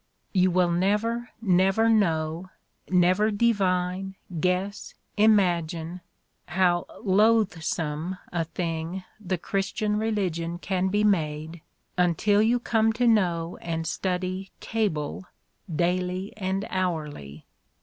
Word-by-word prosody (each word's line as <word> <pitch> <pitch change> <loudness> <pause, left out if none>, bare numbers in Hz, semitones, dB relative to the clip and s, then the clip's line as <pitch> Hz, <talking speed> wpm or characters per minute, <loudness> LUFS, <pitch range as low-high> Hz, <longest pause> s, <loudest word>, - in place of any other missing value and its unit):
— - - -46
"You 185 -1 +4
wiU 175 -1 +2
never, 220 +6 0
never 195 +3 +3
know, 170 -5 +1 0.4
never 185 +4 +4
divine, 190 -4 0 0.2
guess, 185 +3 -1 0.2
imagine, 175 -5 +2 0.5
how 175 -1 +2 0.2
loathsome 185 -6 +1
a 170 -1 0
thing 165 +2 -4 0.2
the 185 -1 -1
Christian 205 +4 -1
religion 180 -6 -1
can 185 +1 -1
be 205 +2 +1
made 160 -4 0 0.4
until 190 +4 +3
you 235 +3 +3
come 225 -2 +2
to 245 +2 0
know 175 -6 +2
and 165 -1 -3
study 185 +2 -2
Cable 190 -7 -2 0.5
daily 180 +3 -1
and 195 0 -2
hourly. 150 - -3
185 Hz, 105 wpm, -26 LUFS, 170-205 Hz, 0.5 s, You